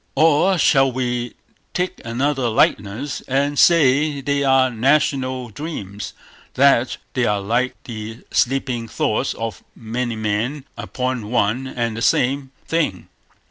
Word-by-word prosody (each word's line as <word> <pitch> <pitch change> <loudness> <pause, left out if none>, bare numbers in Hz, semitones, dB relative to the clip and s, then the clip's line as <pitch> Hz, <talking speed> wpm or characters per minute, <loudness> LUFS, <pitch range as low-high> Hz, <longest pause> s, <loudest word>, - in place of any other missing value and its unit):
Or 160 +5 +4
shall 135 -4 +4
we 120 -2 -2 0.4
take 180 +1 -2
another 130 +2 0
likeness, 110 +5 0
and 140 +2 0
say 150 -2 +4
they 140 +1 0
are 130 -1 +4
national 130 0 +1
dreams; 105 - -6 0.4
that 130 -2 +4 0.2
they 125 -2 +1
are 105 -2 +1
like 120 +6 0
the 110 -1 -7
sleeping 125 -2 0
thoughts 110 +3 -1
of 115 -1 -5
many 120 +1 -3
men 110 +6 -2
upon 125 -4 -3
one 120 +3 +1
and 120 -3 -2
the 115 - -5
same 135 +3 +1 0.2
thing. 155 - -1
130 Hz, 125 wpm, -20 LUFS, 115-140 Hz, 0.4 s, Or